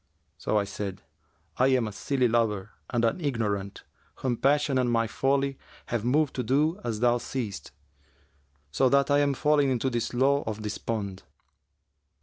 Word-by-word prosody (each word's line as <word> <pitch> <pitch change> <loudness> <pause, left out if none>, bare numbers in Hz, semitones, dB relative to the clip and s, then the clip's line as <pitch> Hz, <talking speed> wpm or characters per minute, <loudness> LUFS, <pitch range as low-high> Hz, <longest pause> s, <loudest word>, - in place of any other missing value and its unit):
So 105 - 0
I 105 - +2
said, 100 -1 -6 0.5
'I 130 - +4
am 130 -4 +2
a - - -5
silly 130 +4 0
lover 110 -3 0 0.2
and 120 -1 +1
an 145 +11 0
ignorant, 105 -7 -2 0.3
whom 125 -2 -1
passion 140 +1 +2
and 125 -1 +1
my 115 -1 +2
folly 135 +3 0 0.3
have 115 -3 -1
moved 140 +3 +2
to 125 - 0
do 150 - +1
as 115 -3 -3
thou 120 0 +3
seest, 110 - -5 1.0
so 130 - +3
that 140 +1 +3
I 145 - +5
am 140 -1 +2
fallen 150 -1 +3
into 130 +1 0
this 120 -1 -1
slough 140 +3 +2
of 110 0 -4
despond.' 105 -2 -4
120 Hz, 160 wpm, -27 LUFS, 110-140 Hz, 1.0 s, I